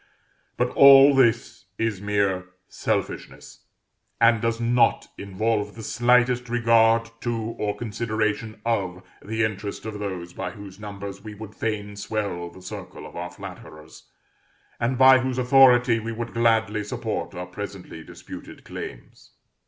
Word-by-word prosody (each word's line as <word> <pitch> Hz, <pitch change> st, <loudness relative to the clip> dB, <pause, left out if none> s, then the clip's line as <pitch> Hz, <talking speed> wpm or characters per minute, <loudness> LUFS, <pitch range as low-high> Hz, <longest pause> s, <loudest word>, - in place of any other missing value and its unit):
But 125 Hz, 0 st, 0 dB
all 140 Hz, 0 st, +8 dB
this 120 Hz, -3 st, +1 dB
is 110 Hz, -4 st, -2 dB
mere 100 Hz, -3 st, 0 dB, 0.2 s
selfishness, -, -, -4 dB, 0.5 s
and 115 Hz, -1 st, +4 dB
does 115 Hz, 0 st, -1 dB
not 120 Hz, 0 st, +2 dB
involve 105 Hz, +1 st, -2 dB
the 115 Hz, -, -9 dB
slightest 125 Hz, +1 st, +2 dB
regard 115 Hz, -1 st, +3 dB
to, 120 Hz, -1 st, -1 dB, 0.2 s
or 105 Hz, -1 st, -2 dB
consideration 110 Hz, -1 st, -2 dB
of, 95 Hz, -6 st, -1 dB, 0.2 s
the 110 Hz, +2 st, -1 dB
interest 105 Hz, -1 st, -4 dB
of 105 Hz, -2 st, -5 dB
those 90 Hz, -4 st, -5 dB
by 90 Hz, -, -4 dB
whose 100 Hz, 0 st, -11 dB
numbers 100 Hz, -1 st, -7 dB
we 110 Hz, -1 st, -8 dB
would 105 Hz, 0 st, -10 dB
fain 105 Hz, -2 st, -3 dB
swell 100 Hz, -4 st, -3 dB
the 95 Hz, +1 st, -15 dB
circle 90 Hz, -, -8 dB
of -, -, -12 dB
our 90 Hz, +1 st, -5 dB
flatterers, 75 Hz, -3 st, -12 dB, 0.7 s
and 120 Hz, +2 st, 0 dB
by 130 Hz, 0 st, +7 dB
whose 130 Hz, -1 st, -2 dB
authority 125 Hz, -2 st, +5 dB
we 115 Hz, +1 st, -5 dB
would 115 Hz, +1 st, -5 dB
gladly 110 Hz, -2 st, +2 dB
support 110 Hz, -2 st, -4 dB
our 90 Hz, 0 st, -5 dB
presently 90 Hz, -3 st, -8 dB
disputed -, -, -11 dB
claims. -, -, -10 dB
110 Hz, 135 wpm, -24 LUFS, 100-120 Hz, 0.7 s, all